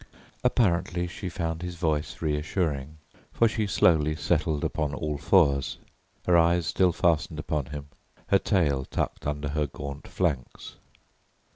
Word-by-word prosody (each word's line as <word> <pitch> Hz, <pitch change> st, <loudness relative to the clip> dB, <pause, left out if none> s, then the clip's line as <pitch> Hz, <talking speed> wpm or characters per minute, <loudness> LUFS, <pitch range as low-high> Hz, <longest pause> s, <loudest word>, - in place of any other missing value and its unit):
Apparently 90 Hz, -7 st, +2 dB
she 90 Hz, +2 st, -6 dB
found 80 Hz, -2 st, -3 dB
his 90 Hz, -1 st, -5 dB
voice 80 Hz, -1 st, -2 dB
reassuring, 75 Hz, -1 st, -1 dB, 0.3 s
for 115 Hz, -, +3 dB
she 110 Hz, -1 st, -1 dB
slowly 75 Hz, -5 st, +3 dB
settled 80 Hz, -2 st, 0 dB
upon 75 Hz, -3 st, -1 dB
all 75 Hz, 0 st, -3 dB
fours, 70 Hz, -6 st, +3 dB, 0.5 s
her 90 Hz, -, +4 dB
eyes 85 Hz, 0 st, +4 dB
still 90 Hz, +3 st, +3 dB
fastened 80 Hz, -2 st, +1 dB
upon 75 Hz, -2 st, -2 dB
him, 75 Hz, -1 st, -7 dB, 0.4 s
her 100 Hz, -, +5 dB
tail 75 Hz, -11 st, +1 dB
tucked -, -, -3 dB
under 75 Hz, 0 st, -2 dB
her 75 Hz, 0 st, 0 dB
gaunt 70 Hz, +1 st, -7 dB
flanks. 75 Hz, -9 st, -3 dB
80 Hz, 135 wpm, -27 LUFS, 75-90 Hz, 0.5 s, her